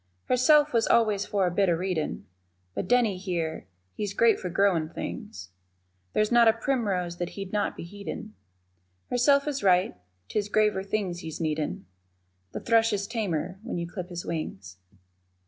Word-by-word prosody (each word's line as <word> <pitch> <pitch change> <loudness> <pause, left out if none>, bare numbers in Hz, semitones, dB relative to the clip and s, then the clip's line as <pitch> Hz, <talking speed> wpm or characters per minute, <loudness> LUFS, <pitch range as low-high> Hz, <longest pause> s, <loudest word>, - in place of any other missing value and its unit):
Herself 295 +4 +4
was 230 -1 +3
always 210 -3 +3
for 200 -3 +1
the 175 - -3
bit 195 -2 +3
of 170 - +2
readin' 180 -3 -2 0.5
But - - -3
Denny 240 -6 +3
here, 170 - -3 0.3
he's 205 -2 -4
great 230 -2 +4
for 180 - -4
growin' 175 -4 +2
things, 170 - -7 0.6
There's 215 +1 +2
not 240 -1 +6
a 225 - +7
primrose 205 -9 -1
that 175 0 -3
he'd 195 -1 -6
not 210 - 0
be - - -6
heedin' 200 - -7 0.8
Herself 280 +4 +4
is 285 -2 -2
right 185 - +3 0.3
'tis 205 - -2
graver 210 -2 +2
things 195 -3 -2
he's 160 -2 -7
needin' 155 - -2 0.7
The - - -5
thrush 225 -1 +3
is 200 -1 -1
tamer 190 -5 -3
when 230 -4 -4
you 170 0 -3
clip 180 0 -6
his 175 -1 -6
wings. 95 - -5
195 Hz, 165 wpm, -27 LUFS, 175-225 Hz, 0.8 s, a